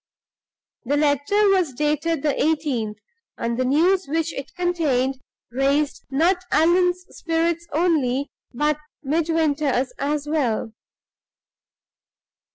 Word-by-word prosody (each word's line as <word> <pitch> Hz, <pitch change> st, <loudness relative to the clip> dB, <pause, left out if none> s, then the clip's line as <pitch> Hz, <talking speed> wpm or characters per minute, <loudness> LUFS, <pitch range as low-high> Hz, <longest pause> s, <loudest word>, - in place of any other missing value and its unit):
The 280 Hz, +3 st, 0 dB
letter 300 Hz, +8 st, +2 dB
was 365 Hz, -8 st, +2 dB
dated 300 Hz, +2 st, 0 dB
the 295 Hz, -2 st, +2 dB
18th, 280 Hz, -10 st, 0 dB, 0.4 s
and 230 Hz, 0 st, -2 dB
the 255 Hz, +1 st, 0 dB
news 345 Hz, +7 st, +2 dB
which 325 Hz, +2 st, -1 dB
it 275 Hz, 0 st, -7 dB
contained 280 Hz, -8 st, 0 dB, 0.3 s
raised 275 Hz, +3 st, 0 dB
not 345 Hz, +7 st, +2 dB
Allan's 355 Hz, +3 st, +3 dB
spirits 335 Hz, 0 st, -1 dB
only, 290 Hz, -5 st, +1 dB, 0.2 s
but 295 Hz, +3 st, 0 dB, 0.2 s
Midwinter's 300 Hz, -3 st, 0 dB
as 295 Hz, +1 st, -1 dB
well. 245 Hz, -8 st, -1 dB
300 Hz, 100 wpm, -22 LUFS, 270-335 Hz, 0.4 s, Allan's